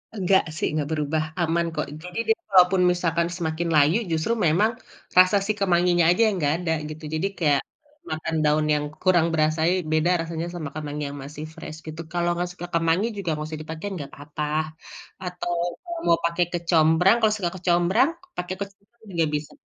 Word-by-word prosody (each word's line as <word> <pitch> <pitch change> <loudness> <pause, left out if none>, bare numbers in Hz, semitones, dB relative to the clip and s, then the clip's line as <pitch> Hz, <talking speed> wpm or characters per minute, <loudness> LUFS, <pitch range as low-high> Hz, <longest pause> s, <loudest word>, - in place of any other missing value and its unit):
Enggak 190 -1 +3
sih, - - 0
enggak 150 -1 -1
berubah. 155 0 0 0.2
Aman 170 +1 +1
kok. 150 - -1 0.2
Jadi 180 +4 -5
dia - - +4 0.2
walaupun 185 0 +6
misalkan 170 -1 0
semakin 170 -1 -3
layu 150 +6 +5
justru 160 +8 +1
memang 205 +8 +3 0.5
rasa 185 +2 +7
si 215 - +1
kemanginya 175 -2 +3
aja 180 +6 +3
yang 210 - 0
enggak 145 -2 +2
ada 160 - 0 0.2
gitu. 155 +1 -9
Jadi 165 +5 0
kayak, 145 -5 +3 0.5
makan 160 0 -2
daun 150 +1 +3
yang 150 0 +1 0.2
kurang 175 -3 +4
berasai 160 +4 +2
beda 155 +3 +3
rasanya 165 0 -4
sama 155 -5 -5
kemangi 150 -1 -4
yang 145 - -8
masih 150 +2 -8
fresh 155 - -8
gitu. 155 +1 -6
Kalau 175 -1 0
enggak 180 0 -1
suka 175 -1 -7
kemangi 165 +4 +2
juga 200 -5 -4
enggak 150 0 -5
usah 155 - -5
dipakein 160 +6 -6
enggak 140 -1 -7
apa-apa. 145 +1 -6 0.8
Atau 180 -1 -4 0.6
mau 170 - +6
pake 170 +1 0
kecombrang, 170 +2 +4
kalau 220 -2 +3
suka 175 -4 -2
kecombrang, 180 - +3 0.3
pake 180 +1 -3
kecombrang 200 +3 -10
juga 165 -2 +1
bisa. 150 0 -4
170 Hz, 175 wpm, -24 LUFS, 155-180 Hz, 0.8 s, rasa